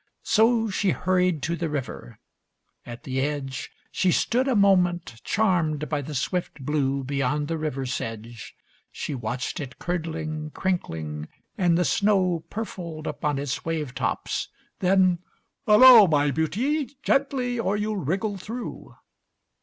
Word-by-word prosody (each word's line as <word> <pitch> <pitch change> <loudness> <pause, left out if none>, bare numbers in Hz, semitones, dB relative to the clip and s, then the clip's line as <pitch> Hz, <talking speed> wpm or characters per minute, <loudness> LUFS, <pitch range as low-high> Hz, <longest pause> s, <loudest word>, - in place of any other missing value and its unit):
So 225 +1 +3
She 195 0 +1
hurried 180 -4 +1
to 170 +3 0
the 170 -1 -3
river. 130 - -5 0.7
At 120 0 -8
the 130 0 -2
edge 140 -2 -3 0.2
She 185 - +2
stood 250 +9 +1
a 260 - +2
moment 180 - +2
charmed 165 -8 +1
by 150 -1 -1
the 150 +2 -7
swift 150 -1 -3
blue 140 -2 0
Beyond 140 +2 -1
the 165 +1 -2
river 140 -4 -3
sedge. 115 -2 -6 0.4
She - - -5
watched 125 +5 -3
it 135 -3 -7
curdling, 160 -3 -3
crinkling, 80 - -3 0.3
and 175 -4 +2
the 180 - +2
snow 185 0 +2
Purfled 170 -8 -6
upon 150 -2 -2
its 140 -2 -3
wave 155 -5 -3
tops. - - -2 0.3
Then, 185 -2 +3 0.5
"Hullo, 220 0 +9
My 145 -2 +2
Beauty, 250 - -1
gently, 255 -3 +1
or 205 -2 0
you'll 210 0 -2
wriggle 195 +6 -1
through." 230 +6 -7
165 Hz, 135 wpm, -25 LUFS, 140-195 Hz, 0.7 s, Hullo